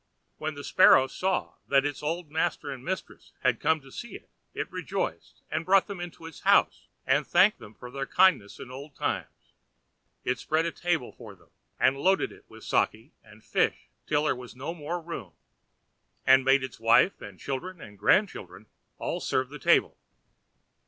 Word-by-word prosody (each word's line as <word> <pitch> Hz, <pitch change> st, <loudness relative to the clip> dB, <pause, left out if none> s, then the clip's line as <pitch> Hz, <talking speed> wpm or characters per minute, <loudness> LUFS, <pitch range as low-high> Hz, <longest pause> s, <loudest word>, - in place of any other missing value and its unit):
When 155 Hz, -1 st, -3 dB
the 145 Hz, -, -8 dB
Sparrow 130 Hz, -, +6 dB
saw 185 Hz, +7 st, -2 dB
that 140 Hz, 0 st, +3 dB
its 145 Hz, -1 st, -3 dB
old 160 Hz, +1 st, -3 dB
master 155 Hz, -2 st, -1 dB
and 130 Hz, -2 st, -8 dB
mistress 190 Hz, +4 st, -6 dB
had 125 Hz, -3 st, +2 dB
come 160 Hz, -1 st, +2 dB
to 135 Hz, -1 st, -16 dB
see 235 Hz, -, -8 dB
it, -, -, -13 dB, 0.2 s
it -, -, -4 dB
rejoiced, -, -, -4 dB
and 155 Hz, +1 st, -1 dB
brought 190 Hz, +2 st, +4 dB
them 200 Hz, -3 st, -7 dB
into 175 Hz, -2 st, -8 dB
its 165 Hz, -2 st, -10 dB
house -, -, +3 dB, 0.2 s
and -, -, +2 dB
thanked -, -, +4 dB
them 105 Hz, -, -13 dB
for 125 Hz, -, -10 dB
their 135 Hz, +1 st, -4 dB
kindness 180 Hz, -, +3 dB
in 125 Hz, -, -9 dB
old 140 Hz, +2 st, -9 dB
times. -, -, -4 dB, 0.7 s
It 125 Hz, -, -1 dB
spread 160 Hz, +1 st, 0 dB
a 170 Hz, -, -1 dB
table 170 Hz, -8 st, -1 dB
for 110 Hz, -5 st, -12 dB
them, 90 Hz, -, -26 dB, 0.3 s
and 135 Hz, -, +4 dB
loaded 190 Hz, +8 st, +2 dB
it -, -, -16 dB
with -, -, -14 dB
sake 115 Hz, +8 st, 0 dB
and 105 Hz, 0 st, -18 dB
fish -, -, 0 dB, 0.2 s
till 150 Hz, 0 st, +2 dB
there 150 Hz, -, +1 dB
was 125 Hz, -1 st, -10 dB
no 140 Hz, +6 st, -5 dB
more 170 Hz, +1 st, -4 dB
room, 160 Hz, -, -7 dB, 0.9 s
and 130 Hz, 0 st, +6 dB
made 135 Hz, +1 st, +4 dB
its 130 Hz, -4 st, -7 dB
wife 115 Hz, +11 st, +4 dB
and 95 Hz, -2 st, -10 dB
children 175 Hz, +7 st, -5 dB
and 105 Hz, -8 st, -12 dB
grandchildren 100 Hz, -, +1 dB, 0.3 s
all -, -, -3 dB
serve 130 Hz, -1 st, -1 dB
the 150 Hz, +1 st, -9 dB
table. -, -, +3 dB
140 Hz, 180 wpm, -28 LUFS, 125-165 Hz, 0.9 s, Sparrow